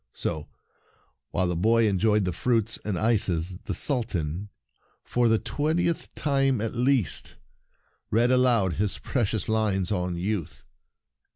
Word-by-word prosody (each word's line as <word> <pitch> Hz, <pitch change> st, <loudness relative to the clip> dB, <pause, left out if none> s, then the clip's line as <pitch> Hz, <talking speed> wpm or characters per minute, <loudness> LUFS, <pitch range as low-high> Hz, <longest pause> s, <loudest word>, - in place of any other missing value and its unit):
So, 80 Hz, -3 st, -3 dB, 0.8 s
while 95 Hz, -, 0 dB
the 90 Hz, -, -1 dB
boy 110 Hz, +6 st, +3 dB
enjoyed 105 Hz, +1 st, +2 dB
the 90 Hz, -, -1 dB
fruits 115 Hz, +3 st, 0 dB
and 105 Hz, -4 st, -2 dB
ices, 95 Hz, -5 st, 0 dB
the 100 Hz, -, -2 dB
Sultan, 100 Hz, -, 0 dB, 0.5 s
for 120 Hz, -1 st, +1 dB
the 110 Hz, -, +4 dB
twentieth 160 Hz, +7 st, -1 dB
time 135 Hz, -4 st, +1 dB
at 110 Hz, +1 st, -2 dB
least, 125 Hz, -3 st, 0 dB, 0.7 s
read 120 Hz, +3 st, +3 dB
aloud 120 Hz, -8 st, +3 dB
his 105 Hz, -1 st, 0 dB
precious 110 Hz, -5 st, -1 dB
Hnes 105 Hz, -4 st, 0 dB
on 90 Hz, -3 st, -1 dB
youth. 95 Hz, -2 st, -3 dB
110 Hz, 125 wpm, -26 LUFS, 90-120 Hz, 0.8 s, the